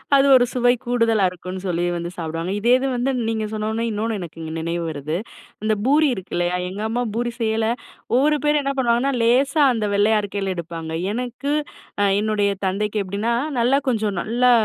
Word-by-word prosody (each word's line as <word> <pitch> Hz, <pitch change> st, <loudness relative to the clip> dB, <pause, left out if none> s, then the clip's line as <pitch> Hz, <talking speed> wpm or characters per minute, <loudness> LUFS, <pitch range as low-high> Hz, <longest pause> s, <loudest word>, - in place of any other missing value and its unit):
அது 275 Hz, 0 st, +5 dB
ஒரு 245 Hz, -, +5 dB
சுவை 245 Hz, -1 st, +3 dB
கூடுதலா 230 Hz, -4 st, +2 dB
இருக்கும்னு 185 Hz, +1 st, -7 dB
சொல்லி 175 Hz, -1 st, 0 dB
வந்து 170 Hz, 0 st, -3 dB
சாப்பிடுவாங்க. 165 Hz, +2 st, -3 dB
இதே 235 Hz, +4 st, +4 dB
இது 270 Hz, +1 st, -1 dB
வந்து 245 Hz, +3 st, 0 dB, 0.2 s
நீங்க 220 Hz, -1 st, -1 dB
சொன்னொன்னே, 220 Hz, +2 st, -1 dB
இன்னொன்னு 220 Hz, +1 st, -2 dB
எனக்கு, 170 Hz, -2 st, -8 dB
இங்க 160 Hz, 0 st, -5 dB
நினைவு 170 Hz, +1 st, -2 dB
வருது. 155 Hz, +1 st, -3 dB, 0.5 s
அந்த 215 Hz, 0 st, +2 dB
பூரி 295 Hz, +3 st, +4 dB
இருக்குல்லயா? 175 Hz, -1 st, -2 dB
எங்க 195 Hz, +3 st, -6 dB
அம்மா 240 Hz, +2 st, 0 dB
பூரி 240 Hz, 0 st, -1 dB
செய்யயில, 220 Hz, -1 st, +1 dB, 0.5 s
ஒவ்வொரு 300 Hz, +3 st, +3 dB
பேரு 295 Hz, 0 st, +3 dB
என்ன 275 Hz, 0 st, -1 dB
பண்ணுவாங்கன்னா, 245 Hz, +2 st, +2 dB
லேசா 275 Hz, +6 st, +3 dB
அந்த 220 Hz, -3 st, -1 dB
வெள்ளையா 210 Hz, +1 st, +4 dB
இருக்கையில 200 Hz, -1 st, -2 dB
எடுப்பாங்க. 165 Hz, -1 st, -6 dB, 0.2 s
எனக்கு 250 Hz, +4 st, -3 dB, 0.5 s
அ -, -, +4 dB, 0.2 s
என்னுடைய 210 Hz, -1 st, +1 dB, 0.2 s
தந்தைக்கு 210 Hz, +3 st, -1 dB
எப்படின்னா, 205 Hz, +5 st, -1 dB, 0.3 s
நல்லா 255 Hz, +4 st, +3 dB
கொஞ்சம் 215 Hz, -5 st, 0 dB
நல்லா 245 Hz, +3 st, +3 dB
220 Hz, 170 wpm, -22 LUFS, 185-245 Hz, 0.5 s, அது